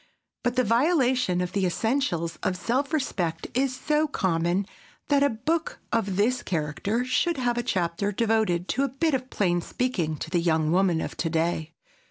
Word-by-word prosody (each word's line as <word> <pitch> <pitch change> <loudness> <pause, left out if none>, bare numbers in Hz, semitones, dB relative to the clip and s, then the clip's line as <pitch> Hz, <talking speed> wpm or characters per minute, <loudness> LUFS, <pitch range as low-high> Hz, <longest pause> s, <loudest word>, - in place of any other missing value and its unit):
But 245 0 0
the 255 - +3
violation 250 - +2
of 180 - -2
the 200 - 0
essentials 180 - 0
of 185 0 -1
self 260 +9 -1
respect 180 - -1
is 260 0 +1
so 305 +1 +1
common 180 - 0 0.4
that 285 -1 +4
a 285 - +4
book 305 +8 -2 0.2
of 205 -5 0
this 240 +6 +2
character 180 +9 -1
should 335 +6 +1
have 245 -2 0
a - - +2
chapter 185 -2 -1
devoted 210 -5 +1
to 270 - +1
a 275 - 0
bit 280 +5 0
of 260 -1 -1
plain 175 -6 +1
speaking 175 -10 -2
to 160 - -6
the 175 -2 +2
young 160 -2 +2
woman 180 -2 +3
of - - -5
to 165 - -1
day. 160 0 -1
210 Hz, 180 wpm, -26 LUFS, 175-255 Hz, 0.4 s, that